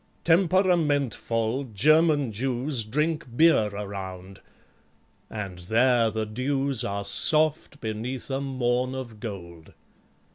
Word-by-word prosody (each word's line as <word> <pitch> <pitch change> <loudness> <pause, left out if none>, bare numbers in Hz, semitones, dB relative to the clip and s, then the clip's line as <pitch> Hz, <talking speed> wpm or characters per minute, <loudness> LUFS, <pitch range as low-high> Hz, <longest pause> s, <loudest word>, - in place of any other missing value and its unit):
Temperamentvoll 145 - +1
German 155 - +3
Jews 125 +3 -1
Drink 150 +8 -1
beer 160 -10 +5
around; 95 -2 -7 0.9
and 95 -4 -6
THERE 115 +5 +3
the 110 0 -3
dews 135 +3 -1
Are 100 -3 -3
soft 155 +5 +1
beneath 115 +4 -4
a 135 +1 -1
morn 130 -1 -1
of 120 -5 -7
gold. 85 -8 -9
125 Hz, 100 wpm, -26 LUFS, 105-145 Hz, 0.9 s, beer